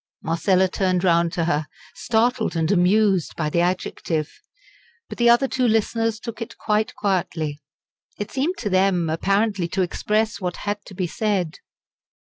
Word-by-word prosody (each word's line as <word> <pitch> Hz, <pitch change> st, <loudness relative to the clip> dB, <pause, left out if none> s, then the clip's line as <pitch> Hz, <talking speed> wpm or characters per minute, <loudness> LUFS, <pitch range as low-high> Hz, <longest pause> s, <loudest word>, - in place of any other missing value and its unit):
Marcella 185 Hz, +3 st, +2 dB
turned 185 Hz, -1 st, 0 dB
round 170 Hz, -2 st, +3 dB
to 170 Hz, -, 0 dB
her, 155 Hz, -3 st, 0 dB, 0.3 s
startled 230 Hz, -2 st, 0 dB
and 165 Hz, +1 st, +1 dB
amused 195 Hz, -1 st, +3 dB
by 155 Hz, -2 st, -2 dB
the 170 Hz, -, +2 dB
adjective. 175 Hz, -3 st, -2 dB, 0.7 s
But -, -, -9 dB
the 235 Hz, 0 st, +5 dB
other 240 Hz, +3 st, +5 dB
two 255 Hz, -1 st, +1 dB
listeners 225 Hz, 0 st, +1 dB
took 230 Hz, 0 st, -7 dB
it 230 Hz, -, -6 dB
quite 215 Hz, +3 st, 0 dB
quietly. 160 Hz, -7 st, -1 dB, 0.6 s
It 205 Hz, 0 st, -5 dB
seemed 310 Hz, +7 st, -1 dB
to 215 Hz, -, -3 dB
them 185 Hz, -3 st, +2 dB
apparently 195 Hz, +2 st, +1 dB
to 185 Hz, +2 st, 0 dB
express 210 Hz, +5 st, -1 dB
what 180 Hz, -1 st, -2 dB
had 205 Hz, 0 st, -2 dB
to 190 Hz, -, -12 dB
be 185 Hz, -1 st, -1 dB
said. 185 Hz, -2 st, -1 dB
195 Hz, 155 wpm, -22 LUFS, 170-220 Hz, 0.7 s, the